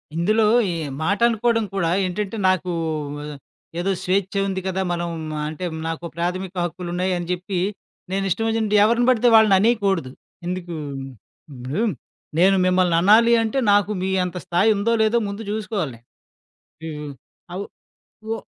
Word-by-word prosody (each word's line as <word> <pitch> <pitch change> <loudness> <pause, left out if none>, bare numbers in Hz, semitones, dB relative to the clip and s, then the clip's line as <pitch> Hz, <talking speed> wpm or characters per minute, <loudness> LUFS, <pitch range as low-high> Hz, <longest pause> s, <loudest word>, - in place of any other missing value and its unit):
ఇందులో 215 +6 +2 0.3
ఈ - - -2 0.3
మాటనుకోడం 230 +3 +2
కూడా 170 -4 +1 0.2
ఏంటంటే, 200 +4 -3
నాకు 185 -1 0 1.1
ఏదో 190 +3 0
స్వేచ్ఛ 190 +1 0
ఉంది 190 -1 -2
కదా! 190 0 -1
మనం 175 0 -2 0.4
అంటే, 155 +4 -5 0.2
నాకు 165 +1 -4
ప్రాథమిక 180 +2 -3
హక్కులున్నాయని 175 0 -3
చెప్పి, 180 +1 -3 0.5
నేనిష్టం 195 +3 0
ఒచ్చినట్టు 220 -2 0
ఎవరిని 235 +3 +3
పడితే 245 -1 +3
వాళ్ళననేయకూడదు. 200 - +3 0.4
ఎందుకు 180 -1 -4 0.8
ఇప్పుడు 130 - -3 0.6
నేను 190 +2 +5
మిమ్మల్ననాలి 185 +6 +4
అంటే, 220 +4 -2 0.2
నాకు 205 0 +3
మీ 190 - -1
అంత 180 0 -5
స్థాయుందో 205 +5 +2
లేదో 220 +2 +2
ముందు 200 +2 -5
చూసుకోవాలి. 205 - -3 0.9
హ్మ్. 160 -1 -5
హ్మ్. 145 -1 -7 0.4
అవు 195 +3 -4 0.6
వో 225 - -1
190 Hz, 120 wpm, -22 LUFS, 175-215 Hz, 1.1 s, నేను